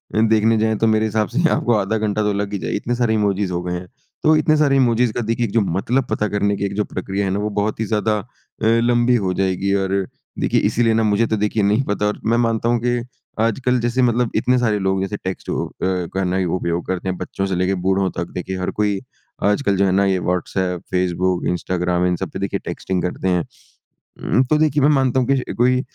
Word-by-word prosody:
देखने 110 0 +3
जाएँ, 110 0 +1
तो 115 - +2
मेरे 110 0 +2
हिसाब 110 0 0
से 125 - -3
यहाँ 165 -2 +3
आपको 120 - +1
आधा 105 +1 0
घंटा 105 0 -1
तो 105 -1 +1
लग 100 0 -3
ही 100 - -2
जाएगा 80 - -3
इतने 120 +1 -2
सारे 120 -2 +1
इमोजीस 100 -3 0
हो 90 0 -2
गए 90 0 -3
हैं। 90 +1 -5 0.4
तो 155 0 +5
इतने 155 0 +3
सारे 145 -2 +3
इमोजीस 125 -3 +3
का 120 - -2
देखिए 115 +1 -1
जो 110 +2 +1
मतलब 110 +8 0
पता 105 - 0
करने 100 0 0
की 100 - -2
एक 100 - -3
जो 105 - +1
प्रक्रिया 95 +2 -3
है 95 - -1
ना, 100 - -1
वो 105 +1 -1
बहुत 105 +1 -2
ही 110 - 0
ज़्यादा 105 0 0
अ, 100 - -11 0.4
लंबी 120 +2 +3
हो 95 -5 0
जाएगी। 95 +1 0
और 95 -1 -1 0.5
देखिए - - +2
इसीलिए 115 0 +2
ना 115 - +2
मुझे 105 +1 +2
तो 110 - 0
देखिए 105 +1 0
नहीं 105 +6 +2
पता 105 -1 -1
और 105 - -2
मैं 115 +2 +2
मानता 115 -1 +1
हूँ 120 - +2
कि 120 0 +1 0.4
आजकल 125 +3 +1
जैसे 120 +2 0
मतलब 120 -1 +2
इतने 125 +3 +2
सारे 110 -4 +1
लोग 95 0 0
जैसे 95 +2 -3
टेक्स्ट 95 -1 -5
अ, - - 0
हो - - -3
का 95 +1 -1
न 90 0 -1
ही 95 - 0
उपयोग 85 0 -2
करते 95 0 -2
हैं। 90 - -3
बच्चों 95 - -3
से 95 -2 -1
लेकर 90 +2 +1
बूढ़ों 95 0 +2
तक 85 - -2
देखिए 95 +1 -4
हर 90 - -2
कोई 105 -2 +1 0.4
आजकल 105 +1 +2
जो 100 - +3
है 95 - +2
ना, 100 +1 +3
ये 95 -1 +1
व्हाट्सएप, 90 0 -2
फ़ेसबुक, 90 0 0
इंस्टाग्राम 90 0 0
इन 90 - +1
सब 95 0 -4
पे - - -6
देखिए 100 0 -2
टेक्स्टिंग 95 -1 -3
करते 90 +1 -2
हैं। 90 -2 +1 0.9
म, 130 - +6
तो 150 +4 +1
देखिए 150 -2 +2
मैं 145 - +5
मानता 130 -1 +2
हूँ 125 - 0
कि 135 -1 0
कोई 125 +2 +2
105 Hz, 245 wpm, -20 LUFS, 95-115 Hz, 0.9 s, म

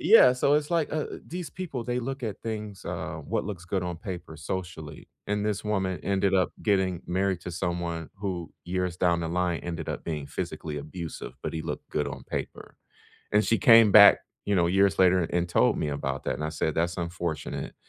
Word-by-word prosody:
Yeah. 165 - +8
So 140 +3 +2
it's 150 +3 0
like, 165 -3 +1
uh - - 0 0.2
uh - - -6
these 175 0 -6
people, 150 -11 -5
they 125 +1 -1
look 135 +1 -4
at 105 -3 -5
things 105 -3 -5
uh, - - -4
what - - -1
looks 95 -4 -6
good 90 0 -1
on 90 -1 -3
paper 85 -3 -7
socially, 80 -1 -6 0.2
and 105 0 0
this 105 -2 -1
woman 95 -4 -1
ended 95 0 +1
up 90 -1 +3
getting 95 -4 +2
married 95 0 0
to 90 - -6
someone 85 -2 -3
who, 95 -4 -4
years 90 0 -2
down 85 -2 +2
the 80 - -2
line, 90 -1 0
ended 85 -2 -5
up - - -4
being 75 -4 -4
physically 75 +1 -4
abusive, 80 +3 -7
but - - -2
he 80 -1 -3
looked - - -5
good - - -1
on - - -8
paper, - - -6 0.6
and 105 +1 +5
she 115 - +2
came 115 -6 +7
back, 100 -1 +9 0.3
you 100 - +1
know, 85 -2 +3
years 95 0 +3
later 90 -1 +5
and 85 +1 -1
told - - +3
me 75 - -1
about 70 -1 -3
that, - - -1
and 75 - -5
I 75 - -1
said, 80 -1 -1
"That's 85 +1 0
unfortunate," 85 -2 -4
90 Hz, 210 wpm, -27 LUFS, 85-105 Hz, 0.6 s, back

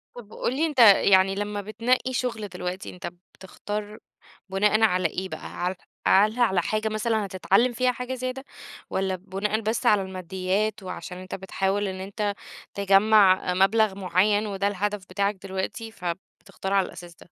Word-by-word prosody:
طب 220 -3 -11
وقُل 245 - -2
لي 315 +4 +2
أنت 295 -5 -3
يعني 195 -3 +6
لمّا 205 0 -3
بتنقّي 235 +5 0
شُغل 235 -4 -2
دلوقتي، 180 0 -5
أنت 180 -1 -7 0.2
بتختار 210 +2 -6 0.5
بُناءً 210 +3 +2
على 185 -4 +3
إيه 190 +1 -5
بقى؟ - - -7 0.2
هل 180 +1 0 0.3
على 215 +5 +4
على 195 -7 +3
حاجة 215 0 -1
مثلًا 215 0 0
هتتعلّم 195 +6 +2
فيها 255 +1 +2
حاجة 250 +1 -5
زيادة 255 +1 -4 0.5
والّا 190 0 -1
بُناءً 195 +3 -2
بس 220 +1 -2
على 210 -2 +5
المادّيات 190 +3 -2
وعشان 185 0 -7
أنت 185 0 -7
بتحاول 195 +2 -1
إن 190 -1 -5
أنت 200 +2 -3 0.4
تجمّع 200 -1 +4
آآ، - - +2
مبلغ 195 +2 +3
معيّن 200 +3 +1
وده 200 0 -1
الهدف 205 0 -2
بتاعك 200 +2 0
دلوقتي، 195 +4 -4
فبتختار 190 +1 -6
على 195 -1 +3
الأساس 175 -1 -11
ده؟ - - -17
200 Hz, 160 wpm, -25 LUFS, 190-215 Hz, 0.5 s, يعني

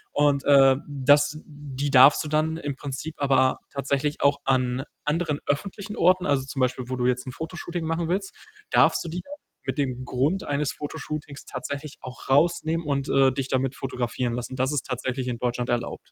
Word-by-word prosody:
und, 145 -2 +3
äh, 135 -2 +7
das 145 +1 +3
die 145 -2 -5
darfst 135 +2 +7
du - - -6
dann 155 +1 0
im 145 -4 -4
Prinzip 145 +3 -6
aber 135 -2 +3
tatsächlich 140 +1 -1
auch 140 0 +3
an 130 -1 +1 0.2
anderen 150 -1 0
öffentlichen 200 +7 -3
Orten 185 +1 +3
also, 140 -2 +2
zum 135 +1 -6
Beispiel, 130 0 0
wo 130 - -2
du 125 - 0
jetzt 125 +1 0
'n 130 - -5
Fotoshooting 170 +3 -5
machen 165 +1 -1
willst, 195 +2 -1 0.4
darfst - - +4
du 165 - -4
die 175 +2 -4
dann 285 - -11 0.3
mit - - -3
dem 130 -2 -1
Grund 140 +10 0
eines 145 0 -1
Fotoshootings 150 -1 -6
tatsächlich 145 +1 -6
auch 125 0 -10
rausnehmen 160 +2 +2
und, 140 -2 -1
äh, 135 -1 +4
dich 135 0 -3
damit 130 0 0
fotografieren 125 -2 -2
lassen. 125 +2 -4
Das 130 +2 +1
ist 145 - -1
tatsächlich 130 0 -3
in 120 - -3
Deutschland 120 0 -2
erlaubt. 120 -1 -1
140 Hz, 185 wpm, -25 LUFS, 130-155 Hz, 0.4 s, äh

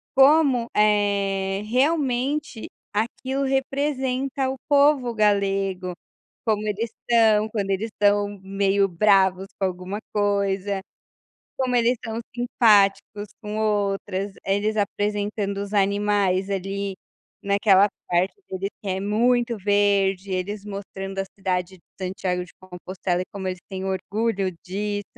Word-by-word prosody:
como, 270 -3 +5
eh, 200 -2 +2
realmente, 270 +1 0 0.3
aquilo 260 +5 -1
representa 270 -1 -1
o - - -4
povo 280 -4 +4
galego. 195 -3 +1 0.5
Como 215 -1 0
eles 215 +2 -2 0.2
são, 220 -2 +4
quando 200 -3 -2
eles 200 +4 -1
estão 205 -1 +1
meio 195 0 +2
bravos 190 0 +3
com 195 - +1
alguma 185 +2 -4 0.2
coisa. 200 -1 0 0.8
Como 255 -2 0
eles 240 +1 +3
são 225 0 -4 0.2
simpáticos 210 -3 +3
com 210 -1 -5
outras, 200 -2 -1
eles 205 +2 0
apresentando 205 0 -1
os 200 0 -7
animais 200 -1 +1
ali, 195 0 -3 0.5
naquela 200 0 +4 0.2
parte, 180 +2 +1
que 190 - -4
diz 195 +1 -2
que 205 - -5
é 190 0 -1
muito 235 +4 +2
verde, 200 -1 +2
eles 195 +3 -3
mostrando 195 -1 -6
a - - -1
cidade 185 -1 -2
de - - -32 0.2
Santiago 185 -1 -2
de 180 - -18
Compostela 180 -1 -4
e - - -6
como 190 -2 -4
eles 185 -1 -4
têm 190 -1 -5
orgulho 195 +1 -1
disso. 205 +2 -3
205 Hz, 125 wpm, -24 LUFS, 195-225 Hz, 0.8 s, como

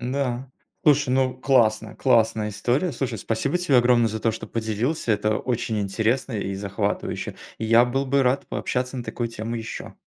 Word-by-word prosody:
Н-да, 130 0 -2 0.3
слушай, 145 -3 +4
ну, 130 0 +2
классно, 110 -5 +2
классная 110 -4 +2
история. 125 - 0
Слушай, 120 -3 -3
спасибо 115 - -1
тебе 175 -7 +2
огромное 120 -1 +4
за 110 +1 -4
то, 115 +1 +1
что 110 - -7
поделился. 115 +4 -1
Это 105 +1 +1
очень 120 -3 -2
интересно 110 +6 0
и 100 -2 -2
захватывающе. 100 0 -3 0.2
Я 115 +2 +5
был 135 +3 -1
бы 140 +1 +3
рад 130 +2 +1
пообщаться 125 +1 -2
на 120 - -4
такую 120 -1 -3
тему 115 +1 -5
ещё. 115 0 -7
120 Hz, 165 wpm, -24 LUFS, 110-130 Hz, 0.3 s, Я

